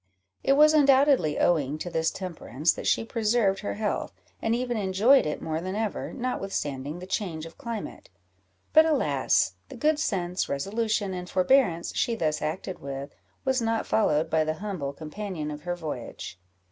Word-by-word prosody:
It 275 - +4
was 305 +2 +6
undoubtedly 275 - +4
owing 150 -4 +2
to 175 +3 -5
this 160 -1 +1
temperance 165 -5 -1
that - - -5
she - - +2
preserved 220 -3 +1
her 205 - -4
health, 210 0 -2 0.3
and 225 +1 +1
even 245 0 -1
enjoyed 210 - +4
it 150 - -4
more 160 0 -2
than 185 +2 -4
ever, 215 -1 -2
notwithstanding 165 - -3
the 180 - -8
change 175 -5 -3
of 165 - -13
climate; 230 -3 -6 0.6
but, 315 - +8
alas! 310 -2 +2 0.2
the - - -9
good 305 0 +2
sense, 180 - -1
resolution, 205 +6 -1
and 180 -1 -6
forbearance 185 -3 +2
she 235 - +1
thus 155 -6 -1
acted 180 +4 -4
with, 140 +1 -6 0.3
was 265 -1 +2
not 225 0 0
followed 155 -7 +2
by 160 -1 +2
the 155 0 -1
humble 185 -7 -4
companion 155 +1 -5
of 150 0 -7
her 175 0 -1
voyage. 145 - -6
190 Hz, 165 wpm, -27 LUFS, 155-230 Hz, 0.6 s, but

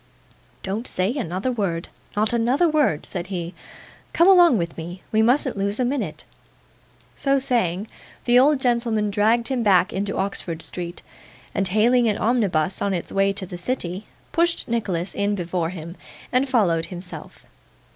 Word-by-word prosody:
'Don't 210 +6 -3
say 185 +5 0
another 195 - -2
word. 190 -8 -2 0.3
Not 215 +2 +1
another 245 +9 +2
word' 295 - +1
said 175 -1 -5
he. 175 -2 -4 0.6
'Come 340 - +5
along 350 - +7
with 170 -3 -3
me. 175 +3 -8
We 220 - +3
mustn't 250 +3 +2
lose 200 +2 -1
a 250 - +2
minute.' 270 +3 -3 0.9
So 275 -1 +2
saying, 225 - 0 0.4
the 245 0 +5
old 285 +2 +4
gentleman 235 -4 +1
dragged 225 +4 +2
him 260 -3 0
back 190 -4 +3
into 200 +1 -2
Oxford 180 -4 -3
Street, 175 -1 -6 0.5
and 195 - +1
hailing 230 +5 +3
an 210 - +1
omnibus 195 -7 0
on 200 -1 0
its 170 - -4
way 195 0 +2
to 195 -1 -3
the 180 -1 -8
city, 190 -3 -3 0.2
pushed 335 0 +1
Nicholas 195 -6 -2
in 205 +1 0
before 175 -2 -2
him, 170 -1 -8 0.4
and 255 +2 +1
followed 175 -10 +2
himself. 180 0 -10
205 Hz, 155 wpm, -23 LUFS, 180-245 Hz, 0.9 s, along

